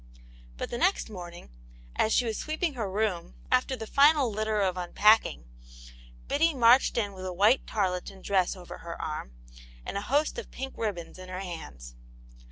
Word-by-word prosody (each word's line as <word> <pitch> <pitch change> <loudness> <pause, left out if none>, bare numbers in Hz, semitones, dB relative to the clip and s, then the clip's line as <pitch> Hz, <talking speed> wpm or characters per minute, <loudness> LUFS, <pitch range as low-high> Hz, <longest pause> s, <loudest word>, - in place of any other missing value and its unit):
But - - -5
the 240 - -3
next 365 - +1
morning, 175 - -9 0.4
as 220 - +2
she 245 - +3
was 225 -2 -2
sweeping 310 +4 -2
her 225 -6 -3
room, 190 -4 -2 0.2
after 255 +1 +2
the 225 -3 -6
final 280 0 +4
litter 215 0 -1
of 190 -2 +1
unpacking, 185 - +3 0.8
Biddy 320 +2 +2
marched 245 +1 +5
in 205 -3 0
with 185 -1 -9
a - - -3
white 210 +8 +3
tarleton 190 -1 -2
dress 190 -2 +1
over 180 -2 -10
her 170 0 -8
arm, 150 - -5 0.5
and - - -4
a - - -6
host 290 - 0
of - - -9
pink 270 0 -6
ribbons 185 -6 -4
in 185 0 -10
her 185 +1 -5
hands. - - -8
210 Hz, 175 wpm, -28 LUFS, 180-250 Hz, 0.8 s, marched